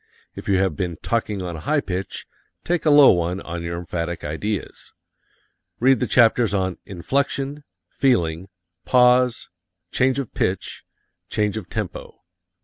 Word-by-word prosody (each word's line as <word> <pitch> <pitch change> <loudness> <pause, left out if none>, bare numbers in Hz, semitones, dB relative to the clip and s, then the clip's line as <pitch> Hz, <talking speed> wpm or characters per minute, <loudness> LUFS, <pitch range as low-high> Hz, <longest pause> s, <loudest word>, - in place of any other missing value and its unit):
If - - -7
you 95 - +4
have 95 -4 +1
been 85 -1 -3
talking 105 -4 -1
on 85 -2 -5
a - - -7
high 150 - +1
pitch, 95 -6 -5 0.4
take 175 -2 -1
a - - +6
low 145 -2 +8
one 90 +1 0
on 85 0 -6
your 85 0 -4
emphatic 85 0 -4
ideas. 90 +5 -5 0.9
Read 130 0 +4
the - - 0
chapters 115 -3 +4
on 95 -2 -1
"Inflection," 140 +8 -2 0.2
"Feeling," 90 -9 0 0.4
"Pause," 125 -1 +3 0.4
"Change 130 0 +2
of 140 -5 -4
Pitch," 95 +1 -2 0.5
"Change 105 -1 0
of 100 -6 -6
Tempo." - - -6
100 Hz, 145 wpm, -22 LUFS, 85-125 Hz, 0.9 s, low